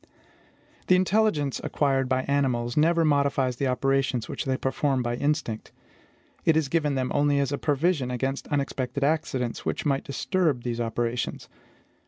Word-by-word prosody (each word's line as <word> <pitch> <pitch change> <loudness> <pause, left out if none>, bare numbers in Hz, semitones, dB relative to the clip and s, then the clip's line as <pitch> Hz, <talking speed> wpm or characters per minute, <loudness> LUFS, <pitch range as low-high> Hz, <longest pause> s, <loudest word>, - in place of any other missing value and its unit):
The 185 - +6
intelligence 185 -7 +1
acquired 135 -3 0
by 130 0 +1
animals 125 -4 0
never 165 +2 +3
modifies 140 -4 +1
the 135 - 0
operations 130 -2 0
which - - -4
they 130 -1 0
perform 135 -1 0
by 120 0 -1
instinct: 145 -5 -2 0.7
it 160 -1 +4
is 155 -4 0
given 150 -3 +1
them 130 -1 -1
only 145 0 +2
as 140 -1 +1
a 145 - -2
provision 145 -2 +1
against 135 +2 -2
unexpected 140 -1 -2
accidents 140 -5 -1
which - - -3
might 140 -2 +1
disturb 145 -1 0
these 120 -1 -2
operations. 115 +1 -2
135 Hz, 150 wpm, -26 LUFS, 125-150 Hz, 0.7 s, The